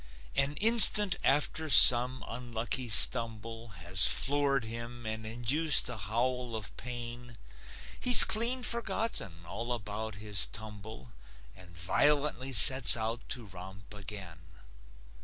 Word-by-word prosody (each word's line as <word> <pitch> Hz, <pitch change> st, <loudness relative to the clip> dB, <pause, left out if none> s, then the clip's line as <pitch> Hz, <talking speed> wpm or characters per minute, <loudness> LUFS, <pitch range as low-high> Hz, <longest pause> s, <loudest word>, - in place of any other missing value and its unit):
An 140 Hz, +2 st, -1 dB
instant 210 Hz, -1 st, +7 dB
after 150 Hz, +3 st, -3 dB
some 125 Hz, -2 st, +4 dB
unlucky 120 Hz, +1 st, -6 dB
stumble 115 Hz, +1 st, 0 dB, 0.2 s
Has 90 Hz, 0 st, +2 dB
floored 140 Hz, -2 st, -1 dB
him 115 Hz, +1 st, -11 dB
and 110 Hz, 0 st, -8 dB
induced 130 Hz, +8 st, -1 dB
a 125 Hz, -, -9 dB
howl 120 Hz, +4 st, -7 dB
of 105 Hz, -3 st, -11 dB
pain, 120 Hz, -1 st, -11 dB, 0.6 s
He's 245 Hz, -1 st, +8 dB
clean 240 Hz, +4 st, -4 dB
forgotten 220 Hz, -, -7 dB
all 120 Hz, +6 st, -10 dB
about 110 Hz, -1 st, -9 dB
his 100 Hz, -3 st, -2 dB
tumble 105 Hz, -, -14 dB, 0.4 s
And 90 Hz, -2 st, -19 dB
violently 135 Hz, -, -3 dB
sets 130 Hz, +1 st, +6 dB
out 115 Hz, +1 st, -7 dB
to 125 Hz, -3 st, -9 dB
romp 95 Hz, 0 st, -15 dB
again. 95 Hz, -4 st, -11 dB
115 Hz, 115 wpm, -26 LUFS, 105-135 Hz, 0.6 s, He's